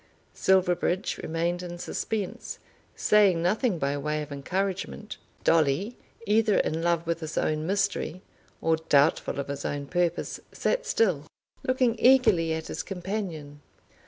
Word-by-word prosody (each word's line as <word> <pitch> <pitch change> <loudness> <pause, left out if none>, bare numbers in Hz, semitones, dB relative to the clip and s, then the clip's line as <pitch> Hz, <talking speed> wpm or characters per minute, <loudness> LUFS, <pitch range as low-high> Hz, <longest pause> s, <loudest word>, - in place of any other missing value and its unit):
Silverbridge 185 0 +1
remained 170 +2 -1
in 175 -1 -6
suspense, 200 +2 -4 0.4
saying 200 -5 +4
nothing 200 +4 +1
by 140 -1 -1
way 150 +1 -1
of 150 - -11
encouragement. 145 - -3 0.3
Dolly, 165 - +2 0.3
either 210 0 +3
in 160 +1 0
love 170 0 +1
with 170 0 -1
his 160 -1 -6
own 155 +1 0
mystery 195 -2 -1 0.4
or 160 0 +2
doubtful 150 -2 +2
of 140 - -3
his 140 0 -5
own 145 0 -3
purpose, 175 +2 -1
sat - - -1
still, 165 -9 +1 0.3
looking 255 -3 +2
eagerly 240 -11 +5
at 160 0 -2
his - - -4
companion. 175 -7 -5
175 Hz, 130 wpm, -27 LUFS, 155-200 Hz, 0.4 s, eagerly